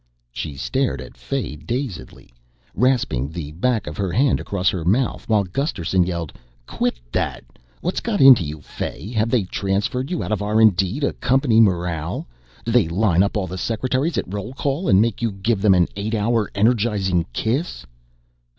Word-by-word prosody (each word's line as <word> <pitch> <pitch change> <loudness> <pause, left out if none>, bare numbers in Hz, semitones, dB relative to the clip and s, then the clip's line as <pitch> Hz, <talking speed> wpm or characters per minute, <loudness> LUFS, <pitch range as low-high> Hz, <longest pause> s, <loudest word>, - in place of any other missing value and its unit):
She 70 +3 -5
stared 60 -2 -1
at - - -10
Fay 60 +4 -4
dazedly, 95 - -6 0.4
rasping 120 - +1
the 80 -2 -6
back 110 +6 0
of 75 +1 -7
her 95 -3 -1
hand 135 +8 +2
across 95 -2 -2
her 90 -4 -3
mouth, 115 +7 0
while 105 -2 +3
Gusterson 95 - 0
yelled, 85 -3 -4 0.3
"Quit - - -2
that! - - -2 0.4
What's 180 - -1
got 220 -4 -2
into 130 -8 +8
you, 75 0 -6
Fay? 100 - -6
Have 110 -1 +1
they 115 -4 +2
transferred 100 +8 -2
you 175 - -2
out 90 - -5
of 105 - 0
R 105 +2 +1
& - - -3
D 95 +8 -1
to 140 - +1
Company 125 -2 +2
Morale? 85 -5 0 0.4
Do 115 - -1
they 115 -7 +4
line 90 +1 +2
up 100 +2 +1
all 100 - -1
the 95 +1 -6
secretaries 130 - -1
at - - 0
roll 105 +4 -4
call 145 +5 -1
and 95 - +6
make 115 0 +1
you 115 -2 0
give 100 +2 -1
them 100 -2 +5
an 90 -1 +3
eight 105 +3 -2
hour 110 0 +1
energizing 100 -5 +1
kiss?" 125 - -2
105 Hz, 180 wpm, -21 LUFS, 90-120 Hz, 0.4 s, into